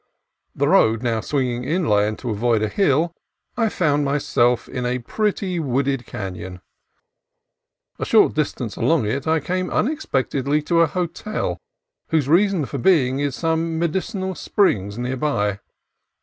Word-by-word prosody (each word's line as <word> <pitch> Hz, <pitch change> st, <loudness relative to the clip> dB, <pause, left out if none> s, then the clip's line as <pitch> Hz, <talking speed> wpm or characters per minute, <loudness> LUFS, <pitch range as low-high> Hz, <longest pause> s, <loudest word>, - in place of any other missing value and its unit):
The -, -, +1 dB
road 110 Hz, +2 st, +4 dB
now 115 Hz, -2 st, 0 dB
swinging 125 Hz, -3 st, -1 dB
inland 110 Hz, -, +1 dB
to 120 Hz, -, -4 dB
avoid 110 Hz, +1 st, +1 dB
a -, -, +1 dB
hill, 165 Hz, -, +1 dB, 0.4 s
I 225 Hz, -2 st, +1 dB
found 150 Hz, -7 st, +1 dB
myself 130 Hz, -4 st, +1 dB
in 125 Hz, -, -4 dB
a 125 Hz, +1 st, 0 dB
pretty, 190 Hz, -, -2 dB
wooded 135 Hz, -3 st, -1 dB
canon. 95 Hz, -2 st, -6 dB, 1.4 s
A -, -, -2 dB
short -, -, +4 dB
distance -, -, -2 dB
along -, -, +2 dB
it 130 Hz, +8 st, -2 dB
I 160 Hz, 0 st, +3 dB
came 185 Hz, +4 st, -2 dB
unexpectedly 145 Hz, -, 0 dB
to 170 Hz, +2 st, +2 dB
a 165 Hz, -, +5 dB
hotel, 180 Hz, +6 st, -3 dB, 0.5 s
whose 155 Hz, -5 st, +1 dB
reason 180 Hz, 0 st, +3 dB
for 140 Hz, -, -5 dB
being 135 Hz, -5 st, +3 dB
is 140 Hz, -2 st, -1 dB
some 165 Hz, 0 st, -1 dB
medicinal 190 Hz, +3 st, -2 dB
springs 105 Hz, -, 0 dB
near 125 Hz, +2 st, -2 dB
by. 105 Hz, -8 st, 0 dB
140 Hz, 140 wpm, -21 LUFS, 120-170 Hz, 1.4 s, a